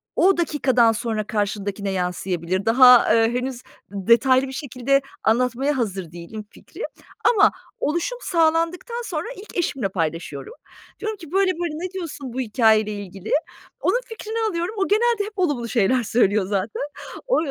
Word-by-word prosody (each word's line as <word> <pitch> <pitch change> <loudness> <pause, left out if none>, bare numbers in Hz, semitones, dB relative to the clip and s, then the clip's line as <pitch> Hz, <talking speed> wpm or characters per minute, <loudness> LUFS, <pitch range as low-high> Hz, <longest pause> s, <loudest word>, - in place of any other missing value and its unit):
o 380 -1 +4
dakikadan 260 -8 +3
sonra 220 -2 -3
karşındakine 205 -2 -2
yansıyabilir. 180 0 -2
Daha, 250 0 +7
eee, 225 +1 +3
henüz 250 0 -3 0.3
detaylı 235 +7 +3
bir - - -7
şekilde 275 0 0 0.2
anlatmaya 250 +5 +1
hazır 195 -8 -3
değilim 175 +5 -8
fikri. - - -13 0.5
Ama 425 -3 +5 0.3
oluşum 345 +11 -1
sağlandıktan 335 +7 0
sonra - - -3
ilk 400 -1 -10
eşimle 270 - -1
paylaşıyorum. 165 -5 -4 0.5
Diyorum 435 -1 -3
ki, 330 -6 -12
böyle 385 0 +3
böyle, 345 -3 -3
ne - - -16
diyorsun 305 -9 -6
bu 260 - -4
hikâyeyle 220 -3 +3
ilgili? 195 -1 -7 0.5
Onun - - +1
fikrini 450 0 -6
alıyorum. 345 +3 -3
O 390 - +1
genelde 445 0 +2
hep 425 - -8
olumlu 280 -10 0
şeyler 240 +3 +2
söylüyor 210 -3 +2
zaten. 200 +2 -2 0.5
O - - +3
250 Hz, 145 wpm, -22 LUFS, 205-340 Hz, 0.5 s, Daha